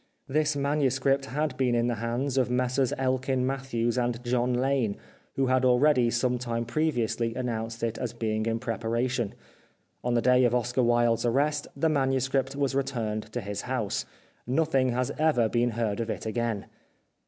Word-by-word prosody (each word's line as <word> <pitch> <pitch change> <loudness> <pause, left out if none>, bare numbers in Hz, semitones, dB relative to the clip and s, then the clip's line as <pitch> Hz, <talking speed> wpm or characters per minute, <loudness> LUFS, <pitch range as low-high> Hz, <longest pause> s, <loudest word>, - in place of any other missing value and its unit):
This 150 +2 +1
manuscript 140 -1 +1
had 150 +2 -2
been 125 -2 +2
in 120 0 +2
the 120 - +1
hands 125 +4 -1
of 130 -2 +2
Messrs 125 +1 +1
Elkin 130 0 0
Mathews 130 -3 -1 0.2
& 120 - -11
John 125 0 +1
Lane, 125 -5 +1 0.4
who 135 - +2
had 130 0 +2
already 125 0 +4
some 125 +1 0
time 120 -1 -2
previ 150 -1 0
ously 115 +1 -2
announced 115 -2 -3
it 115 -1 -1
as 125 -3 -2
being 110 -1 -2
in 115 0 0
preparation. 115 0 -2 0.7
On 120 0 0
the - - +4
day 125 +1 +5
of 120 0 +2
Oscar 125 +1 +1
Wilde's 120 -1 +3
arrest, 145 +5 +1
the 140 +4 +1
manuscript 135 -2 +1
was 140 -1 0
returned 115 -6 -2
to 120 - -3
his 100 0 -4
house. - - -2 0.4
Nothing 135 -1 +2
has 125 +1 0
ever 150 -8 +3
been 120 +2 +1
heard 115 -2 -2
of 115 -1 -2
it - - -4
again. 115 -2 -2
125 Hz, 170 wpm, -27 LUFS, 115-135 Hz, 0.7 s, day